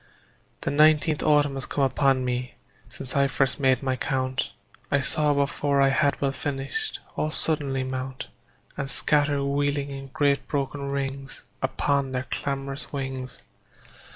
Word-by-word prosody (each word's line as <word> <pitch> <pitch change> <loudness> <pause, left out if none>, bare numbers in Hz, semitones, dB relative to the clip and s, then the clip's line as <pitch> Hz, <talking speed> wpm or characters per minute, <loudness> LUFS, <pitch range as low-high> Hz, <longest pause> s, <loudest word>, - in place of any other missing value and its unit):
The - - -1
nineteenth 155 +1 +4
autumn 145 -2 +3
has 135 -2 -4
come 140 - 0
upon 135 -1 +2
me 125 0 -2 0.3
Since 130 - -5
I 140 0 +4
first 135 0 +1
made 130 -1 +3
my 130 -1 +1
count; 130 -1 -1 0.4
I 140 - +3
saw, 150 +2 +2
before 140 0 +1
I 135 0 +5
had 140 0 +2
well 140 -1 +1
finished, 145 - -3 0.2
All 155 - 0
suddenly 145 -4 +2
mount 130 0 -4 0.5
And 140 0 -3
scatter 145 +1 +2
wheeling 140 0 0
in 135 0 -7
great 140 0 +1
broken 140 0 -2
rings 135 -1 -4 0.2
Upon 135 0 0
their 130 +1 -2
clamorous 140 0 -3
wings. 130 -2 -5
140 Hz, 145 wpm, -26 LUFS, 135-145 Hz, 0.5 s, I